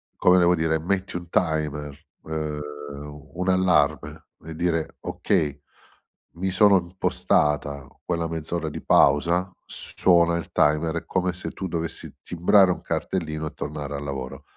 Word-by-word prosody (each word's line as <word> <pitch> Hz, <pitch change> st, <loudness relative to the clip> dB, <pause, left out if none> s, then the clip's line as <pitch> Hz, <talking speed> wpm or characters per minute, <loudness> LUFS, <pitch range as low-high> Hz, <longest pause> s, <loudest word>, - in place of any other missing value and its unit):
come 90 Hz, 0 st, +5 dB
devo 90 Hz, 0 st, +4 dB
dire 80 Hz, -1 st, +1 dB
metti 95 Hz, +3 st, -2 dB
un 85 Hz, -1 st, -5 dB
timer, 75 Hz, -4 st, -1 dB, 0.3 s
ehm, 75 Hz, -1 st, -3 dB, 0.4 s
un 75 Hz, 0 st, -11 dB
un 90 Hz, +2 st, -2 dB
allarme 90 Hz, -5 st, +2 dB, 0.2 s
e 80 Hz, -1 st, -7 dB
dire: 80 Hz, -1 st, -1 dB
"Okay, 70 Hz, -1 st, -1 dB, 0.7 s
mi 95 Hz, +3 st, -2 dB
sono 100 Hz, +2 st, +5 dB
impostata 75 Hz, -5 st, 0 dB, 0.2 s
quella 85 Hz, -1 st, -1 dB
mezz'ora 80 Hz, 0 st, -3 dB
di -, -, -7 dB
pausa." 85 Hz, +6 st, +3 dB, 0.2 s
S -, -, -7 dB
suona 85 Hz, -2 st, +4 dB
il 85 Hz, -, -6 dB
timer, 75 Hz, +2 st, +2 dB
è -, -, -5 dB
come 90 Hz, -1 st, 0 dB
se 90 Hz, -, -5 dB
tu 95 Hz, -, -5 dB
dovessi 85 Hz, -1 st, -4 dB
timbrare 90 Hz, +2 st, +4 dB
un -, -, -4 dB
cartellino 80 Hz, -4 st, -3 dB
e -, -, -8 dB
tornare 75 Hz, -1 st, -5 dB
al 70 Hz, -, -5 dB
lavoro. 70 Hz, 0 st, -6 dB
80 Hz, 150 wpm, -24 LUFS, 75-90 Hz, 0.7 s, come